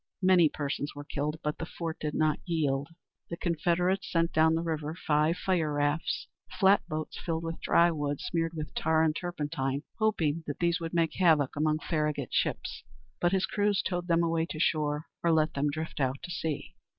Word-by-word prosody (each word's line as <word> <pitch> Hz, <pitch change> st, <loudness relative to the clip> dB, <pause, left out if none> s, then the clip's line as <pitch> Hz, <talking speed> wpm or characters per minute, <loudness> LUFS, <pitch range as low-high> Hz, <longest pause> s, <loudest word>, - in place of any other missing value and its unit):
Many 180 Hz, -4 st, +6 dB
persons 145 Hz, 0 st, -3 dB
were 145 Hz, -, -7 dB
killed, 150 Hz, +1 st, -3 dB
but 150 Hz, 0 st, -2 dB
the 165 Hz, -, -3 dB
fort 165 Hz, -2 st, -5 dB
did 150 Hz, -1 st, -3 dB
not 155 Hz, -1 st, +2 dB
yield. 145 Hz, -5 st, 0 dB, 0.4 s
The 170 Hz, -, -4 dB
Confederates 175 Hz, +3 st, 0 dB
sent 165 Hz, 0 st, +1 dB
down 160 Hz, +1 st, +4 dB
the 165 Hz, -, -1 dB
river 155 Hz, -1 st, -3 dB
five 155 Hz, 0 st, +1 dB
fire 175 Hz, -5 st, 0 dB
rafts, 145 Hz, +2 st, 0 dB, 0.3 s
flat 195 Hz, +1 st, +6 dB
boats 155 Hz, -2 st, -4 dB
filled 165 Hz, -1 st, -2 dB
with 165 Hz, 0 st, -5 dB
dry 170 Hz, 0 st, +4 dB
wood, 145 Hz, -3 st, -2 dB
smeared 165 Hz, -1 st, -2 dB
with 155 Hz, -1 st, -5 dB
tar 160 Hz, 0 st, +2 dB
and 155 Hz, -1 st, +2 dB
turpentine, 150 Hz, -6 st, -2 dB, 0.2 s
hoping 165 Hz, -8 st, +1 dB
that 145 Hz, -, -3 dB
these 170 Hz, 0 st, +1 dB
would 165 Hz, 0 st, -5 dB
make 165 Hz, -2 st, +2 dB
havoc 155 Hz, -7 st, +4 dB
among 155 Hz, +1 st, +1 dB
Farragut's 150 Hz, -5 st, -1 dB
ships; -, -, -1 dB, 0.4 s
but 175 Hz, -, +2 dB
his 190 Hz, -1 st, +2 dB
crews 205 Hz, -1 st, +1 dB
towed 175 Hz, -2 st, -2 dB
them 170 Hz, -1 st, +3 dB
away 165 Hz, 0 st, +1 dB
to 155 Hz, -, -6 dB
shore, 150 Hz, -1 st, +1 dB, 0.2 s
or 170 Hz, -, +3 dB
let 155 Hz, -1 st, +3 dB
them 145 Hz, +1 st, +1 dB
drift 160 Hz, +2 st, -4 dB
out 130 Hz, -1 st, +1 dB
to 175 Hz, -, -6 dB
sea. 155 Hz, -1 st, -3 dB
160 Hz, 190 wpm, -29 LUFS, 150-170 Hz, 0.4 s, Many